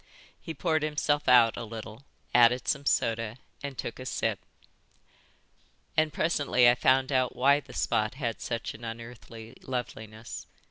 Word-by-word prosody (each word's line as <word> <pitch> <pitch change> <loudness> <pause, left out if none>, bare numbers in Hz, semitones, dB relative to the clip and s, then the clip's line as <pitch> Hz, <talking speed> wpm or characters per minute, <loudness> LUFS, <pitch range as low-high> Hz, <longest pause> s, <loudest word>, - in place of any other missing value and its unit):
He 160 - -7
poured 160 -3 0
himself 150 -1 0
out 120 -3 +6
a - - -5
little, 110 +3 -9 0.3
added 120 +1 +5
some 140 -1 -1
soda, 115 0 0 0.2
and 140 -2 -6
took 115 - -5
a 130 - -6
sip. 110 -5 -1 1.6
"And 155 0 +2
presently 145 -6 +2
I 120 - +7
found 130 +2 +2
out 130 -2 +1
why 140 +3 +4
the - - -14
spot 110 +2 0
had 120 -5 -3
such 115 -2 -3
an 115 - -13
unearthly 115 0 -9
loveliness. 110 -3 -6
125 Hz, 145 wpm, -28 LUFS, 115-140 Hz, 1.6 s, I